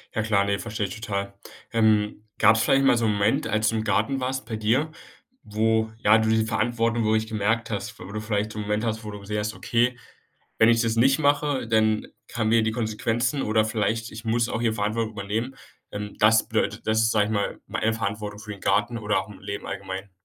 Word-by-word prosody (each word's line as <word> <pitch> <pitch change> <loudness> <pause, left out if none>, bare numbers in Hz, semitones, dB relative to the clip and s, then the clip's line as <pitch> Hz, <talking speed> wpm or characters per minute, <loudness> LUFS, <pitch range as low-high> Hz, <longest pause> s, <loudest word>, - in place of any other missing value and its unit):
Ja 110 - +1
klar, 105 -2 +2
ne, 100 0 0
verstehe 105 0 -3
ich 95 - -6
total. 100 -2 -3 0.4
Ähm, 110 -2 +2
gab's 110 +1 +5
vielleicht 135 +3 +3
mal 125 - +5
so 115 - +1
'n 105 - +2
Moment, 105 +8 +1
als 110 0 +1
du 115 - -1
im 110 - -1
Garten 135 +6 +1
warst 130 0 -3
bei 115 -1 -4
dir, 120 +9 +1 0.5
wo, 110 +1 0
ja, 110 0 +5
du 110 0 +1
die 110 0 +2
Verantwortung 115 +1 0
wirklich 110 0 +2
gemerkt 110 +1 -1
hast, 100 -2 -4
wo - - -9
du 105 +1 -4
vielleicht 105 -1 -1
so 110 - -6
'n - - -1
Moment 105 +2 -1
hast, 110 -1 -2
wo 105 - -6
du 105 0 -7
gesehen 105 +1 -3
hast: 105 +1 -3
”Okay, 120 +2 +1 0.6
wenn 110 - +6
ich 115 0 +4
das 115 -1 0
nicht 135 +5 +4
mache, 145 -3 +1
dann 110 -1 +2 0.3
haben 110 -2 0
wir 115 -1 +5
die 110 - +1
Konsequenzen.“ 115 +4 -1
Oder 110 0 +2
vielleicht: 110 +1 -1
„Ich 110 +1 -9
muss 115 +1 +1
auch 115 - -2
hier 115 -2 +1
Verantwortung 110 +1 -1
übernehmen.“ 110 +6 -3 0.3
Ähm, 105 0 -6
das 110 +1 +5
bedeutet, - - -1
dass 110 0 +2
du, 115 - +3
sage 110 -2 +3
ich 110 - -3
mal, 100 -2 -1 0.2
eine 115 - +2
Verantwortung 105 -1 -4
für 105 0 -8
den 100 - -11
Garten 115 +4 +1
oder 105 -2 0
auch 95 - -4
im 105 -2 -12
Leben 100 0 -6
allgemein 95 0 -6
110 Hz, 225 wpm, -25 LUFS, 105-115 Hz, 0.6 s, wenn